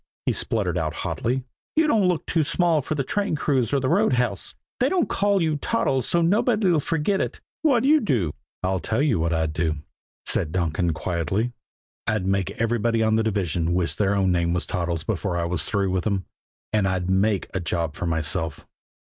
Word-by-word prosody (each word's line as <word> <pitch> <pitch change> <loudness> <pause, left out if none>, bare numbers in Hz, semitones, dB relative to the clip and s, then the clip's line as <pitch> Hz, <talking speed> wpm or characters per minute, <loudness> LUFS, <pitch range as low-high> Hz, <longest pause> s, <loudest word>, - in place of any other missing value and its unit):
he - - +2
spluttered 95 -6 0
out 80 -1 -2
hotly. 125 +2 -1 0.3
"You 320 0 +4
don't 220 -10 +3
look 180 -3 0
too 165 - +1
small 165 +1 +2
for 155 - -3
the 140 - 0
train 200 +4 -1
crews 135 -6 +1
or 140 - +2
the 130 - -1
roundhouse, 125 -6 +1
and - - -39 0.2
they 255 - +3
don't 355 0 +1
call 200 -2 +2
you 155 -2 +1
Toddles 135 - 0
so's 170 -1 +2
nobody'll 200 -2 +3
forget 165 +6 0
it. - - -3 0.2
What'd 270 -5 +3
you 310 +2 +6
do?" 115 - 0 0.3
"I'll 95 0 +1
tell 110 - 0
you 135 - +2
what 85 +1 0
I'd 80 -2 0
do," 80 0 0 0.5
said 80 - 0
Donkin 85 -1 0
quietly. 90 +8 -1 0.6
"I'd 105 -3 0
make 95 -1 +1
everybody 115 0 +1
on 110 0 +3
the 110 - +3
division 90 -6 0
wish 85 -5 0
their 100 +3 +1
own 95 -2 +2
name 85 -1 +1
was 90 - -1
Toddles 85 -4 -2
before 90 0 -2
I 85 - 0
was 90 +1 -1
through 100 -2 0
with 95 -1 -1
them, 100 -3 0 0.5
and 105 -3 +2
I'd 95 -1 -1
make 95 +1 +2
a - - +1
job 85 -2 -2
for 85 - -4
myself." 80 -2 -1
100 Hz, 200 wpm, -24 LUFS, -, 0.6 s, you